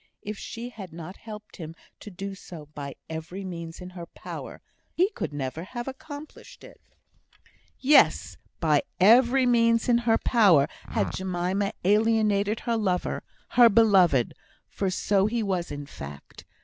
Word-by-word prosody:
If 210 Hz, +1 st, -5 dB
she 230 Hz, +4 st, -7 dB
had 195 Hz, -7 st, -10 dB
not 170 Hz, +3 st, -8 dB
helped 215 Hz, -1 st, -11 dB
him 165 Hz, -3 st, -8 dB, 0.2 s
to -, -, -9 dB
do 195 Hz, +1 st, -6 dB
so 170 Hz, -5 st, -10 dB
by 140 Hz, -2 st, -6 dB
every 170 Hz, +5 st, -6 dB
means 170 Hz, -2 st, -7 dB
in 180 Hz, 0 st, -8 dB
her 175 Hz, -2 st, -9 dB
power, -, -, -9 dB, 0.3 s
he 370 Hz, +5 st, +2 dB
could -, -, -4 dB
never 145 Hz, +2 st, -4 dB
have 240 Hz, +6 st, -6 dB
accomplished 290 Hz, +3 st, -10 dB
it. -, -, -15 dB, 1.0 s
Yes! 290 Hz, +3 st, +4 dB, 0.2 s
by 150 Hz, -3 st, +3 dB, 0.2 s
every 245 Hz, +6 st, +6 dB
means 230 Hz, -2 st, +3 dB
in 240 Hz, -1 st, +4 dB
her 225 Hz, -1 st, +2 dB
power 190 Hz, -, +4 dB, 0.2 s
had -, -, -1 dB
Jemima 185 Hz, +2 st, -1 dB
alienated 210 Hz, 0 st, +2 dB
her 235 Hz, -2 st, 0 dB
lover, 185 Hz, -5 st, -1 dB, 0.3 s
her 240 Hz, -1 st, +7 dB
beloved 195 Hz, -, +4 dB, 0.3 s
for 195 Hz, -, -2 dB
so 195 Hz, +2 st, +1 dB
he 230 Hz, +1 st, -1 dB
was 185 Hz, -4 st, -2 dB
in 145 Hz, 0 st, -6 dB
fact. 70 Hz, -, -11 dB
200 Hz, 150 wpm, -26 LUFS, 170-230 Hz, 1.0 s, her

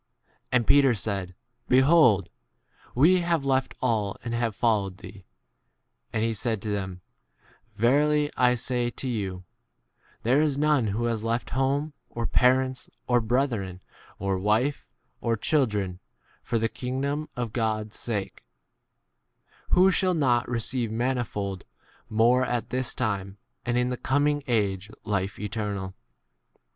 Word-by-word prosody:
B -, -, -51 dB, 0.3 s
And 120 Hz, -2 st, +3 dB
Peter 135 Hz, -2 st, +5 dB
said, 95 Hz, -3 st, -3 dB, 0.3 s
Behold, 130 Hz, -, +5 dB, 0.7 s
we 170 Hz, +9 st, +5 dB
have 170 Hz, -4 st, 0 dB
left 130 Hz, -1 st, +1 dB
all 110 Hz, -5 st, 0 dB
and 120 Hz, 0 st, -4 dB
have 115 Hz, -3 st, -1 dB
followed 100 Hz, -5 st, +1 dB
thee. 105 Hz, -, -11 dB, 1.0 s
9 -, -, -27 dB
And 110 Hz, -, 0 dB
he 115 Hz, 0 st, +1 dB
said 110 Hz, +1 st, -1 dB
to 110 Hz, -, -3 dB
them, 95 Hz, -3 st, -3 dB, 0.7 s
Verily 145 Hz, +6 st, +3 dB
I 125 Hz, -1 st, +4 dB
say 120 Hz, 0 st, -1 dB
to 130 Hz, -, -6 dB
you, 95 Hz, -6 st, -3 dB, 0.8 s
There 130 Hz, +6 st, +3 dB
is 150 Hz, -3 st, +1 dB
none 150 Hz, -5 st, +2 dB
who 110 Hz, +4 st, -1 dB
has 115 Hz, -2 st, -1 dB
left 115 Hz, +1 st, -2 dB
home, 140 Hz, +4 st, 0 dB
1 -, -, -21 dB
or 115 Hz, -, -1 dB
parents, 130 Hz, +1 st, +2 dB, 0.2 s
or 120 Hz, -1 st, +3 dB
brethren, 110 Hz, -6 st, -1 dB, 0.4 s
or 95 Hz, -1 st, -1 dB
wife, 110 Hz, +9 st, +1 dB, 0.3 s
or 115 Hz, -1 st, 0 dB
children, 105 Hz, -, 0 dB, 0.4 s
for 115 Hz, -, -1 dB
the 115 Hz, 0 st, +1 dB
kingdom 140 Hz, +6 st, -3 dB
} -, -, -42 dB
of 120 Hz, -3 st, -3 dB
God's 110 Hz, -2 st, -1 dB
sake, 105 Hz, -5 st, -4 dB, 1.3 s
who 185 Hz, +2 st, +5 dB
shall 185 Hz, -1 st, +2 dB
not 125 Hz, -6 st, +2 dB
re 120 Hz, -1 st, 0 dB
ceive 120 Hz, 0 st, -2 dB
manifold 110 Hz, -5 st, -2 dB, 0.5 s
more 120 Hz, +4 st, +4 dB
at 120 Hz, -2 st, -2 dB
this 130 Hz, 0 st, -1 dB
time, 100 Hz, -4 st, -2 dB, 0.3 s
and 120 Hz, 0 st, +1 dB
in 125 Hz, +1 st, +1 dB
the 125 Hz, -, -2 dB
coming 145 Hz, +3 st, +1 dB
age 100 Hz, -4 st, 0 dB
life 100 Hz, -2 st, -2 dB
eternal. 105 Hz, -3 st, -4 dB
120 Hz, 145 wpm, -26 LUFS, 105-130 Hz, 1.3 s, Peter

